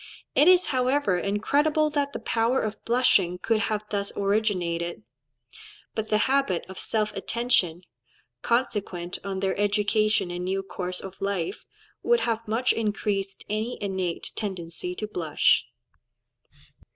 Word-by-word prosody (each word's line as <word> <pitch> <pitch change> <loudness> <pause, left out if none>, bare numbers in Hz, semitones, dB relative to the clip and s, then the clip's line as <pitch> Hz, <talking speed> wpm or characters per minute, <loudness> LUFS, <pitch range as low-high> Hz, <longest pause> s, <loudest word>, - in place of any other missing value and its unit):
It 295 - +5
is, 365 0 +7
however, 255 -6 +2
incredible 295 - +1
that 285 -1 0
the - - -4
power 230 +3 +1
of 215 0 -4
blushing 215 -7 +3
could 220 +4 +1
have 215 -1 -1
thus 200 -1 -1
originated; 180 - 0 0.9
but 220 -1 -3
the 215 - +3
habit 265 -10 +1
of 190 -1 -9
self 215 -1 0
attention, 210 -8 +1 0.6
consequent 200 -7 -1
on 195 -1 -3
their 190 -1 0
education 210 -1 +2
and 175 0 -4
new 190 +1 -1
course 180 -1 -3
of 190 0 -10
life, 195 -4 -2 0.3
would 475 0 +3
have 230 -1 -1
much 230 +4 +2
increased 205 -3 -2
any 215 +4 -2
innate 190 -4 -2
tendency 180 -3 -4
to 215 - -3
blush. 165 -7 +2
205 Hz, 130 wpm, -26 LUFS, 185-230 Hz, 0.9 s, is